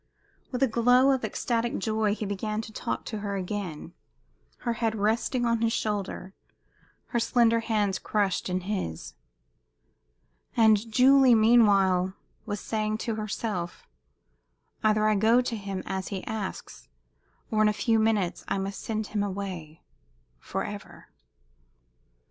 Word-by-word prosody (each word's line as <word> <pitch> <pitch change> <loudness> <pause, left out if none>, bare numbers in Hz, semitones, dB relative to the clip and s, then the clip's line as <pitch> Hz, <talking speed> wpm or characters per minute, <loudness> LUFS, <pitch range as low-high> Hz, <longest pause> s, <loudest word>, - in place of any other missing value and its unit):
With 255 0 0
a - - +5
glow 245 +3 +4
of 265 -2 0
ecstatic 235 -1 -1
joy 215 0 0
he 220 - -4
began 210 +2 -3
to 220 - -9
talk 230 - -4
to 215 - -4
her 200 -1 -3
again, 185 -4 -5 0.7
her 235 - -1
head 230 -1 -1
resting 225 +4 0
on 230 -1 +1
his 230 0 +2
shoulder, 200 -2 -3 0.8
her 235 - 0
slender 230 0 +3
hands 210 -4 0
crushed 200 -3 -1
in 185 0 -1
his. 175 - -4 1.4
And 220 -1 +4
Julie, 260 +1 +6
meanwhile, 200 -5 +4 0.3
was 205 - -3
saying 215 -1 -2
to 230 - -1
herself, 210 -4 -4 1.0
"Either 215 0 +3
I 215 - +4
go 220 +4 +4
to 245 -2 -1
him, 195 -3 -5
as 190 0 -3
he 195 -2 -5
asks, 210 - -6 0.6
or 215 -1 +2
in 215 - +5
a - - +2
few 220 +2 +1
minutes 215 -5 +1
I - - -1
must 195 +1 -4
send 220 -1 -3
him 210 - +1
away 185 -6 -5 0.6
forever." - - -6
215 Hz, 135 wpm, -27 LUFS, 195-230 Hz, 1.4 s, Julie